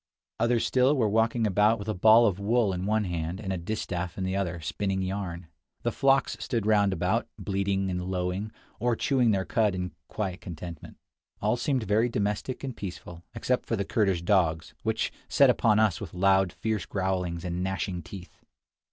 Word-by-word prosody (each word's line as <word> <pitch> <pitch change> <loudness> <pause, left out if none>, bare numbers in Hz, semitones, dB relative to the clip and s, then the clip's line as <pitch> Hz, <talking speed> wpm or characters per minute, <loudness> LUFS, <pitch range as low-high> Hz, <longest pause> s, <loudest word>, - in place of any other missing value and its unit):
Others 115 0 +2
still 130 +3 +3
were 115 -4 +3
walking 115 +2 +2
about 105 +3 +3
with 100 -1 -8
a 110 - 0
ball 110 +5 +6
of 100 -3 +1
wool 105 0 +2
in 90 +1 -3
one 110 0 +2
hand 85 -1 -3
and 95 -3 -3
a - - -2
distaff 90 -2 -4
in 95 - -2
the 95 +1 -1
other, 90 -3 -2
spinning 95 +5 -2
yarn. 95 -3 -4 0.4
The - - +1
flocks 135 0 +2
stood 115 -5 -2
round 105 -2 +4
about, 90 - 0
bleating 95 -1 -1
and 90 0 -2
lowing, 95 +3 -2 0.3
or 120 0 +1
chewing 125 -1 +2
their 95 -3 +1
cud 105 -4 +1
in 90 -1 -3 0.2
quiet 95 -5 -4
contentment. 85 -2 -8 0.4
All 105 +3 +1
seemed 130 0 0
very 110 +4 +2
domestic 105 +5 -2
and 130 -3 -4
peaceful 90 -3 -8
except 125 0 -1
the 100 -4 0
Kurdish 95 -6 +1
dogs, 85 -4 +1
which - - -1 0.2
set - - +6
upon 110 -2 +3
us 110 -5 +2
with - - -7
loud, 95 0 +3
fierce 110 -1 -3
growls 90 -3 -2
and 90 0 -2
gnashing 95 -1 -2
teeth. 90 +2 -11
100 Hz, 180 wpm, -27 LUFS, 90-110 Hz, 0.4 s, ball